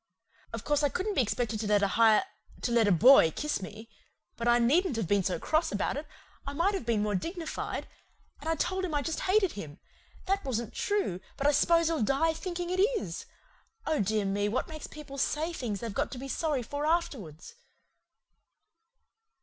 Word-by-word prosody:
"Of - - -5
course 295 0 +1
I 290 - +3
couldn't 405 +8 -2
be 315 - +3
expected 220 0 -1
to 215 - -2
let 205 -1 +3
a 200 - +2
hir 225 - +5 0.4
to 240 - 0
let 230 -2 +4
a - - +4
boy 225 +1 +7
kiss 295 - -2
me. 215 +4 -9 0.5
But 235 - -3
I 240 0 +6
needn't 280 +6 +3
have 220 -6 -2
been 200 +1 +2
so 180 - 0
cross 315 +2 0
about 200 - -1
it. 295 +2 -5 0.4
I 280 - -5
might 345 +7 +1
have 380 - -4
been 220 -3 +2
more 210 0 -1
dignified. 330 - -4 0.5
And 320 - -5
I 325 - +2
told 375 +4 -1
him 340 -5 -2
I 290 - 0
just 325 +1 -2
hated 385 -1 +2
him. 160 -5 -8 0.5
That 395 +1 0
wasn't 235 -3 -3
true, 405 - -1 0.2
but 275 - -3
I 290 - +6
s'pose 335 +3 +3
he'll 325 -4 0
die 275 +8 +2
thinking 350 +1 -4
it 370 - -1
is. 405 - -1 0.6
Oh, 315 - 0
dear 210 +1 +1
me, 205 +1 0
what 235 - -1
makes 310 -1 -7
people 285 -3 -9
say 315 +6 0
things 225 -10 -4
they've 230 -3 -4
got - - -1
to - - -6
be 270 +2 -6
so 320 +4 -2
sorry 280 -5 0
for 285 +5 -4
afterwards?" 255 - -2
275 Hz, 205 wpm, -29 LUFS, 215-330 Hz, 0.6 s, boy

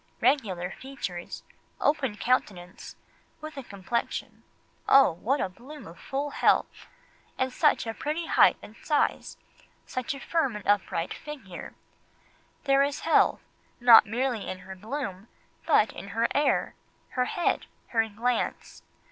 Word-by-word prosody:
Regular 210 -9 +1
features, 195 -11 -7 0.4
open 275 -7 +1
countenance, 195 -7 -2 0.4
with 310 0 -8
a 275 - -5
complexion—oh, 235 +3 0
what 235 - -1
a - - 0
bloom 255 +11 -12
of 165 +1 -12
full 280 +2 -3
health; - - +1 0.5
and 260 -1 -1
such - - +3
a 225 - -3
pretty 305 +8 -3
height - - +5
and 215 - -12
size, 300 -2 0 0.5
such 255 +3 -3
a - - -8
firm 275 -6 0
and 210 - -8
upright 195 -4 +1
figure. 260 -12 -9 0.9
There 275 -1 +4
is 285 +1 0
health, 325 - +3 0.4
not 240 -3 +8
merely 240 0 -2
in 185 - -4
her 190 0 -8
bloom, 210 -1 -5 0.4
but 225 -9 +4
in - - -9
her 225 +3 0
air, 290 +1 +1 0.4
her 250 -1 0
head, 345 +6 -1 0.2
her 225 -1 +1
glance. 235 +4 -2
245 Hz, 130 wpm, -27 LUFS, 200-280 Hz, 0.9 s, not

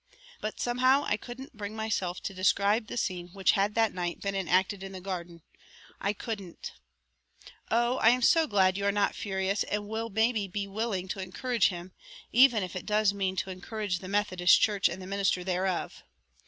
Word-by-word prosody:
But 215 - -5
somehow 255 +3 +3
I - - +1
couldn't 250 +4 -10
bring 210 0 -6
myself 205 -5 -2
to 195 - -4
describe 200 +4 +2
the - - -6
scene 180 -5 -2
which 195 -1 +3
had 205 0 +1
that 225 -1 +2
night 175 -1 -3
been 200 0 -2
enacted 190 +1 +1
in 195 0 -7
the 190 - -6
garden 175 -3 -6 0.6
I 200 - 0
couldn't. 200 -4 -6 1.0
"Oh, 240 +2 +2
I 225 - +5
am 250 +1 +2
so 325 +2 +5
glad 190 -4 +3
you 200 - -2
are - - +4
not 205 0 +1
furious 195 0 -1
and 205 0 -3
will 225 +2 -3
maybe 220 0 +1
be 200 +2 -3
willing 200 -2 -3
to 195 - -3
encourage 230 +5 +1
him, 180 0 -6 0.4
even 240 -4 +5
if 185 0 -6
it 185 - -6
does 210 -1 +3
mean 190 -2 -1
to 190 +2 -2
encourage 190 0 -3
the 185 - -9
Methodist 185 -3 +3
Church 205 -2 +2
and 175 - -6
the 185 - -8
minister 195 -1 0
thereof. 185 0 -2
200 Hz, 190 wpm, -29 LUFS, 185-220 Hz, 1.0 s, I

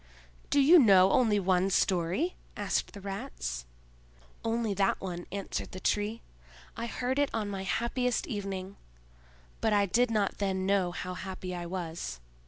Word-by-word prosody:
"Do 285 - +3
you 320 +6 +8
know 195 -6 +6
only 220 -5 +4
one 185 0 +2
story?" 185 - +1 0.2
asked - - -1
the 200 - -9
Rats. 60 - -5 0.8
"Only 225 -2 0
that 195 0 +1
one," 175 -2 -5
answered 200 0 -4
the 185 - -6
Tree. 210 +4 -1 0.5
"I 235 - -3
heard 255 +3 -1
it 285 - +3
on 215 -2 -1
my 195 -1 -4
happiest 235 - 0
evening; 195 - -5 0.8
but 220 - +1
I 205 -1 +4
did 240 +6 +2
not 210 -3 0
then 190 -2 0
know 190 -2 +2
how 180 +1 -5
happy 185 0 -6
I 175 -1 -4
was." 165 - -5
195 Hz, 155 wpm, -30 LUFS, 185-225 Hz, 0.8 s, you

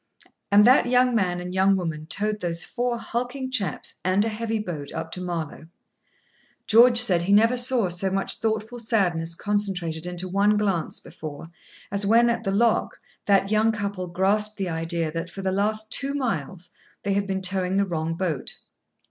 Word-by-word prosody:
And 205 +1 +7
that 250 0 +5
young 250 0 +3
man 180 -5 0
and 180 0 -6
young 190 +1 +3
woman 155 -4 -4
towed 210 +5 -2
those 170 -2 0
four 245 -1 -2
hulking 250 +3 -4
chaps 200 - -3
and 185 +3 +2
a - - 0
heavy 225 +1 -2
boat 165 -9 -5
up 165 0 -5
to 185 - -6
Marlow. 165 -3 -5 1.0
George 235 +2 +6
said 185 -8 +3
he 190 +4 +1
never 225 +4 +5
saw 245 -4 +2
so 180 +2 -1
much 195 +1 -2
thoughtful 220 +2 -2
sadness 180 -8 0
concentrated 180 -5 -2
into 180 +1 -4
one 200 +3 +2
glance 195 -6 -1
before, 155 +1 -9 0.4
as 200 0 0
when, 230 +3 +4
at 235 - -3
the - - -2
lock, 225 +3 +1 0.3
that 195 0 +3
young 215 +1 +3
couple 200 -4 -4
grasped 205 +4 +1
the 190 -3 -2
idea 165 0 -2
that, 165 +2 -4
for 195 +2 -8
the 190 - 0
last 215 +3 -1
two 275 +3 +2
miles, 185 - -3 0.3
they 200 - 0
had 200 0 0
been 190 -1 -3
towing 185 0 0
the 200 - +3
wrong 165 -2 -3
boat. 165 -6 -2
195 Hz, 180 wpm, -24 LUFS, 175-220 Hz, 1.0 s, And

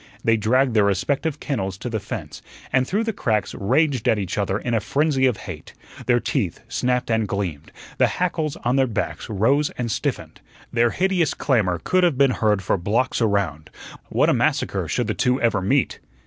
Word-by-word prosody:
They 115 - +4
dragged 125 +4 +2
their 105 -2 +4
respective 140 +9 0
kennels 95 -9 -3
to 125 - -6
the 115 -2 -2
fence, 100 - -7 0.3
and 130 -1 +3
through 210 +4 0
the 225 -1 -2
cracks 110 - -1
raged 130 +4 +1
at 110 - +4
each 95 -4 -3
other 100 -1 0
in 120 +1 -3
a 115 - +3
frenzy 140 +2 +1
of 125 -5 0
hate; - - -9 0.3
their 120 -1 +4
teeth 110 - -2
snapped 125 -1 -1
and 110 -1 +1
gleamed; 90 -7 -4 0.3
the - - +5
hackles 165 -4 -1
on 125 +3 +1
their 135 -1 +3
backs 110 - -3
rose 130 +9 +2
and 120 -2 -2
stiffened. - - -3 0.3
Their 120 0 +3
hideous 180 +1 +1
clamor 105 -10 +1
could 185 0 +2
have 170 -7 +3
been 140 -1 +4
heard 105 -4 +1
for 90 - +1
blocks 115 +9 0
around. 100 -9 0 0.4
What - - +2
a - - +4
massacre - - 0
should - - -1
the - - -1
two 125 +1 +1
ever 115 -5 +1
meet! 130 +8 +1
120 Hz, 190 wpm, -22 LUFS, 100-140 Hz, 0.4 s, the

